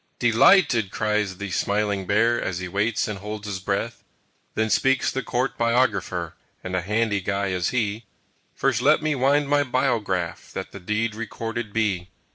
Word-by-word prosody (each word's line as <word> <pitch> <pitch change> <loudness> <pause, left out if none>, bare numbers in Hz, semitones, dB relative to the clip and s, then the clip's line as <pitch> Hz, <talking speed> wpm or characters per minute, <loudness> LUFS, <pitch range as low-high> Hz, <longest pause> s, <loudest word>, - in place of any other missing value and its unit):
"Dee 120 -2 +2
lighted!" 120 - +5
cries 105 -3 -1
the 100 -1 -5
smiling 100 -1 0
Bear, 115 +3 +3
As 90 - -2
he 90 0 -4
waits 105 +4 0
and 105 -3 -4
holds 105 +1 -6
his 100 -2 -4
breath. 100 +5 -3 0.5
Then 110 0 0
speaks 135 +6 +2
the 135 - -2
Court 125 +1 -2
Biographer, 110 -8 +1 0.3
And 90 0 -3
a 90 - +1
handy 105 +1 0
guy 100 +1 -1
is 90 -2 0
he, 110 -2 -1 0.5
"First 130 -4 +1
let 150 +3 +4
me 155 -1 +1
wind 140 +2 +2
my 145 0 +3
biograph, 115 -10 -1
That - - -5
the 100 - -9
deed 105 +4 -1
recorded 115 0 -5
be." 100 -5 -1
105 Hz, 170 wpm, -24 LUFS, 100-120 Hz, 0.5 s, lighted